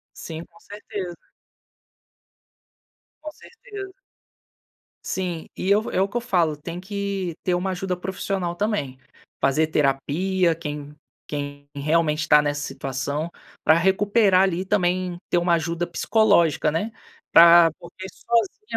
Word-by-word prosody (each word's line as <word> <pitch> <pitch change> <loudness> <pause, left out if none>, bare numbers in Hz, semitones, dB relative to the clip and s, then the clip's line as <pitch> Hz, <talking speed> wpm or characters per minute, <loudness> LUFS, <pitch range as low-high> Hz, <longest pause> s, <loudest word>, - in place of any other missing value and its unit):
Sim. 165 0 -7
Com 210 - -23
certeza. 200 -3 -7 2.1
Com 305 0 -6
certeza. 410 -3 -10 1.1
Sim, 180 -4 -3
e 185 - -3
eu 210 +1 +5
vou - - -6
é 185 - +2
o 195 - +2
que 240 - -4
eu - - -1
falo, 170 -9 +1
tem 170 +3 -7
que 195 -3 -4
ter 180 - +1
uma 190 +2 -1
ajuda 185 0 -2
profissional 185 -1 -3
também. 175 -10 -2 0.4
Fazer 155 +3 +2
terapia, 160 +5 +1
quem 150 -2 -7 0.3
quem 145 -1 -6
realmente 155 +1 +1
tá 150 0 +6
nessa 145 0 -2
situação, 140 +4 -4 0.3
pra 160 - +5
recuperar 195 +1 +3
ali, 185 -1 0
também, 180 -2 0
ter 175 - +2
uma 175 0 +2
ajuda 170 +1 -1
psicológica, 170 -6 +2
né, 205 +8 -2 0.4
pra 170 -1 +8
porque 185 +2 -10
sozinha 235 - -2
175 Hz, 130 wpm, -23 LUFS, 155-195 Hz, 2.1 s, pra